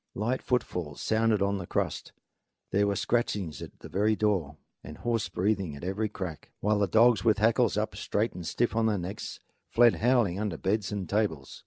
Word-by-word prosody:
Light 120 Hz, +5 st, -1 dB
footfalls 90 Hz, -, -2 dB
sounded 110 Hz, -2 st, +2 dB
on 100 Hz, 0 st, 0 dB
the 90 Hz, -, -7 dB
crust; -, -, -2 dB, 0.6 s
there 100 Hz, +1 st, +3 dB
were 100 Hz, -, 0 dB
scratchings 100 Hz, -6 st, -1 dB
at -, -, -10 dB
the -, -, -8 dB
very 105 Hz, +3 st, +1 dB
door 95 Hz, -9 st, 0 dB, 0.3 s
and 75 Hz, +3 st, -9 dB
hoarse 115 Hz, -5 st, -1 dB
breathings 95 Hz, -4 st, -1 dB
at 70 Hz, -, -12 dB
every 100 Hz, +4 st, -1 dB
crack; 90 Hz, -6 st, -6 dB
while 105 Hz, +1 st, +1 dB
the 100 Hz, -, +2 dB
dogs, 115 Hz, -1 st, +4 dB
with 110 Hz, -2 st, +4 dB
hackles 110 Hz, +2 st, +3 dB
up -, -, -1 dB
straight 110 Hz, +3 st, -1 dB
and 85 Hz, -2 st, -7 dB
stiff 120 Hz, -1 st, 0 dB
on 115 Hz, 0 st, +2 dB
their 105 Hz, -2 st, +1 dB
necks, 95 Hz, +4 st, -6 dB, 0.3 s
fled 120 Hz, -1 st, +5 dB
howling 115 Hz, -6 st, +2 dB
under 105 Hz, -6 st, -2 dB
beds 100 Hz, +3 st, -1 dB
and 100 Hz, -3 st, -3 dB
tables. 100 Hz, -9 st, -1 dB
105 Hz, 190 wpm, -28 LUFS, 95-110 Hz, 0.6 s, fled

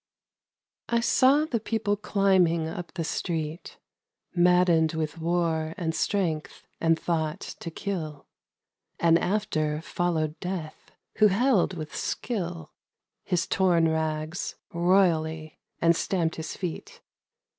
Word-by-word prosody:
I 235 Hz, 0 st, +2 dB
SAW 270 Hz, +5 st, +4 dB
the 245 Hz, -7 st, -1 dB
people 215 Hz, -2 st, -1 dB
climbing 190 Hz, -5 st, +2 dB
up 170 Hz, +1 st, -6 dB
the 170 Hz, -, -2 dB
street 160 Hz, 0 st, -4 dB, 0.6 s
Maddened 175 Hz, -2 st, +4 dB
with 160 Hz, 0 st, -3 dB
war 165 Hz, -1 st, 0 dB
and 160 Hz, -2 st, -1 dB
strength 165 Hz, -5 st, -1 dB
and 165 Hz, 0 st, +2 dB
thought 160 Hz, -2 st, -1 dB, 0.2 s
to 170 Hz, -, -5 dB
kill. 160 Hz, -5 st, -5 dB, 0.7 s
And 165 Hz, 0 st, +5 dB
after 155 Hz, -7 st, 0 dB
followed 160 Hz, -4 st, -1 dB
Death, 180 Hz, -4 st, -6 dB, 0.3 s
who 215 Hz, -, +7 dB
held 210 Hz, -2 st, +2 dB
with 155 Hz, -1 st, -6 dB
skill 175 Hz, -8 st, -3 dB, 0.5 s
His 180 Hz, -3 st, 0 dB
torn 175 Hz, -4 st, +3 dB
rags, 160 Hz, +1 st, -2 dB, 0.2 s
royally, 165 Hz, -3 st, +1 dB, 0.2 s
and 170 Hz, 0 st, +4 dB
stamped 165 Hz, -2 st, -1 dB
his 160 Hz, -, -5 dB
feet. 180 Hz, -4 st, -6 dB
170 Hz, 115 wpm, -27 LUFS, 160-190 Hz, 0.7 s, who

